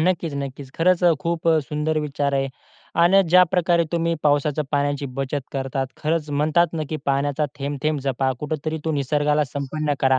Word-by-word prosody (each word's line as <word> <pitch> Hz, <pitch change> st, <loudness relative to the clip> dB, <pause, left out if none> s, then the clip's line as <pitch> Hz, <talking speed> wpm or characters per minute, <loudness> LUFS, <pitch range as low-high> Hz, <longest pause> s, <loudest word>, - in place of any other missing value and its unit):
नक्कीच, 170 Hz, -2 st, 0 dB
नक्कीच. 140 Hz, -1 st, -6 dB
खरंच 180 Hz, +2 st, +3 dB
अ, 175 Hz, -, +6 dB
खूप 170 Hz, 0 st, -1 dB
अ, 160 Hz, -1 st, +5 dB
सुंदर 155 Hz, +1 st, -1 dB
विचार 145 Hz, -1 st, -1 dB
आहे 135 Hz, 0 st, 0 dB, 0.5 s
अन 180 Hz, +3 st, +6 dB
ज्याप्रकारे 180 Hz, -1 st, +4 dB
तुम्ही 170 Hz, 0 st, +1 dB
पावसाच्या 145 Hz, 0 st, +2 dB
पाण्याची 145 Hz, -1 st, 0 dB
बचत 135 Hz, +1 st, -2 dB
करतात, 135 Hz, 0 st, -2 dB
खरंच 155 Hz, 0 st, -1 dB
म्हणतात 155 Hz, +4 st, +2 dB
ना 160 Hz, -, -2 dB
की 155 Hz, -, -1 dB
पाण्याचा 140 Hz, +2 st, +1 dB
थेंब-थेंब 145 Hz, +2 st, -1 dB
जपा 135 Hz, 0 st, 0 dB
कुठेतरी 155 Hz, +1 st, -3 dB
तो 160 Hz, -, 0 dB
निसर्गाला 150 Hz, +1 st, +1 dB
संपन्न 145 Hz, +2 st, -3 dB
करा. 130 Hz, -1 st, +4 dB
150 Hz, 165 wpm, -22 LUFS, 140-165 Hz, 0.5 s, अ